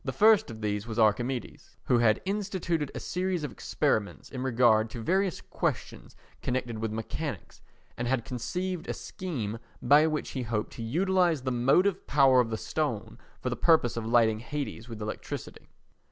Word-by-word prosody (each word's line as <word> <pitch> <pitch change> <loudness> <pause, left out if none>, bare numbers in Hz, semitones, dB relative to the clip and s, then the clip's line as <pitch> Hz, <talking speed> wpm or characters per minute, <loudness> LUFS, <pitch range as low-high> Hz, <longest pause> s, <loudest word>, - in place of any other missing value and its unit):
The - - -2
first 220 0 +5
of 110 -1 -8
these 105 +1 -2
was 110 -1 -5
Archimedes 120 +3 0
who 120 - +3
had 110 -2 +3
instituted 190 -6 -1
a - - -3
series 180 -2 -2
of 145 - -3
experiments 105 -2 -1
in 130 - -5
regard 115 -4 +3
to 120 - -7
various 190 - +1
questions - - -4 0.3
connected 125 -3 -2
with 110 -1 -2
mechanics 115 - -5 0.3
and 120 - -3
had 125 -2 0
conceived 180 +9 -3
a - - -1
scheme 125 - -5 0.2
by 145 +5 +5
which 155 -1 -2
he 130 - -3
hoped 110 -3 -2
to - - -8
utilise 175 +5 +2
the 130 0 -2
motive 175 +11 +2
power 135 -2 +5
of 120 -2 +2
the 110 - -2
stone 115 -6 -3 0.2
for 125 - -2
the - - -1
purpose 155 -3 +3
of 115 -1 -3
lighting 115 -2 +4
Hades 125 -2 -5
with 110 -2 -6
electricity. 105 - -6
125 Hz, 170 wpm, -29 LUFS, 115-160 Hz, 0.3 s, first